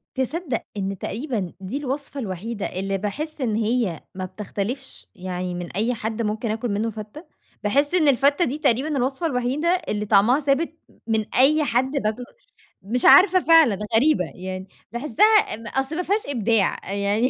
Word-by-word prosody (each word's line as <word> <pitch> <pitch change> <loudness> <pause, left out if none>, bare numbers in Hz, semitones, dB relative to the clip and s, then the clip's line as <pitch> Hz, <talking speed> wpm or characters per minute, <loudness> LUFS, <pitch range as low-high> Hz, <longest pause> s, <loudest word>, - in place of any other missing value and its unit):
تصدّق 265 0 -2
إن 195 -1 -3
تقريبًا 220 - -3
دي 195 +7 -5
الوصفة 285 0 -4
الوحيدة 205 0 -4
اللي 195 +1 -3
باحس 295 +10 -4
إن 230 -4 0
هي 225 -6 0
ما 185 - -4
بتختلِفش 205 +5 -5
يعني 180 -1 -4
من 175 -1 -6
أي 220 +6 0
حد 220 +1 -3
ممكن 215 +1 -2
أكَل 225 +2 -2
مِنُّه 210 +3 -1
فتّة، 215 - -9 0.4
باحس 280 +9 +2
إن 320 -5 +4
الفتّة 280 +5 +3
دي 290 -1 -2
تقريبًا 270 -1 +2
الوصفة 265 +5 -1
الوحيدة 265 +3 -1 0.2
اللي 210 0 -2
طَعمها 215 +7 +4
ثابت 290 +3 0 0.2
م - - -24 0.2
من 220 -1 +1
أي 300 +4 +4
حد 260 0 +1
باكل 245 -4 -2 0.6
مش 235 +6 -1
عارفة 370 0 +8
فعلًا 325 - +5 0.2
غريبة، 265 - +3
يعني 185 +1 -6 0.2
باحسّها 300 - +3
م 225 +1 -10
أصْل 270 +6 -2
ما 360 - -1
فيهاش 405 +1 0
إبداع 225 -7 0
أ - - -2
يعني 205 +5 +1
235 Hz, 165 wpm, -23 LUFS, 205-285 Hz, 0.6 s, عارفة